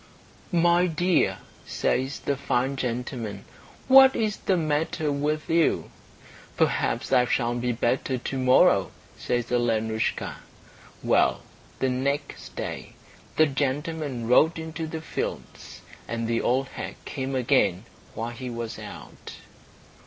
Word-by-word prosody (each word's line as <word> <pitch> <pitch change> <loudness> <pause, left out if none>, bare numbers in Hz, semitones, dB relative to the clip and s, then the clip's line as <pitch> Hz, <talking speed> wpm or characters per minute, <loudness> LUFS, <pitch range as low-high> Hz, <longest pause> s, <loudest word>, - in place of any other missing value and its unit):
"My 175 0 +4
dear," 175 +2 +1 0.3
says 130 +2 -1
the 140 - -1
fine 135 0 0
gentleman, 120 -5 -4 0.4
"what 265 0 +8
is 215 -2 0
the 190 - 0
matter 155 0 0
with 150 +2 -1
you?" 165 -1 +1 0.7
"Perhaps - - 0
I 125 - +5
shall 120 -1 0
be 120 0 -1
better 125 +3 0
to 135 +2 -4
morrow," 130 0 +4 0.3
says 120 -1 -2
Alenoushka. 110 -2 0 0.7
Well, - - +2 0.3
the 130 - 0
next 135 +3 -3
day - - -5 0.4
the 155 - +5
gentleman 145 -2 -2
rode 155 +7 +4
into 160 0 -5
the 160 0 -5
fields, 160 - -6 0.3
and 115 0 -3
the 115 0 0
old 130 +3 +1
hag - - -6
came 135 0 -4
again 115 -8 +2 0.3
while 115 +1 -3
he 125 +1 -6
was 115 -1 -5
out. - - -10
135 Hz, 125 wpm, -26 LUFS, 120-155 Hz, 0.7 s, what